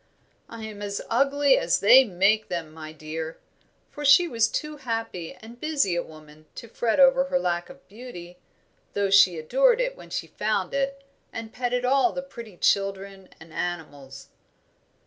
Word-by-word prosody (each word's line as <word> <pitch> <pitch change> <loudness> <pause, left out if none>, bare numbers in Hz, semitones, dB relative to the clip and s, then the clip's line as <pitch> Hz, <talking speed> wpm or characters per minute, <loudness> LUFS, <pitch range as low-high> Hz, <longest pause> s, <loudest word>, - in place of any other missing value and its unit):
"I 230 -1 -9
am 215 -2 -8
as 200 -1 -4
ugly 275 +3 +3
as 165 - +1
they 255 +6 +7
make 210 +1 +1
them, 170 -3 -4
my 155 -1 -9
dear," 160 +1 -7 0.5
for 295 - -8
she 290 +5 +6
was 230 -7 +1
too 300 0 -4
happy 225 - -5
and 230 +2 -14
busy 290 - 0
a 175 - 0
woman 155 -1 -15
to 235 - -9
fret 225 +2 -1
over 270 0 +5
her 275 0 0
lack 175 -7 -2
of 270 0 -15
beauty, 180 -6 -11 0.5
though 200 -1 0
she 185 -3 +6
adored 480 - +2
it - - -1
whenever - - -14
she - - -2
found 210 -3 -2
it, 275 0 -2 0.3
and 225 0 -8
petted 250 0 -2
all 275 +7 +3
the 270 - -4
pretty 235 -8 -11
children 195 0 -1
and 160 0 -15
animals. 145 -7 -6
215 Hz, 165 wpm, -25 LUFS, 175-270 Hz, 0.5 s, they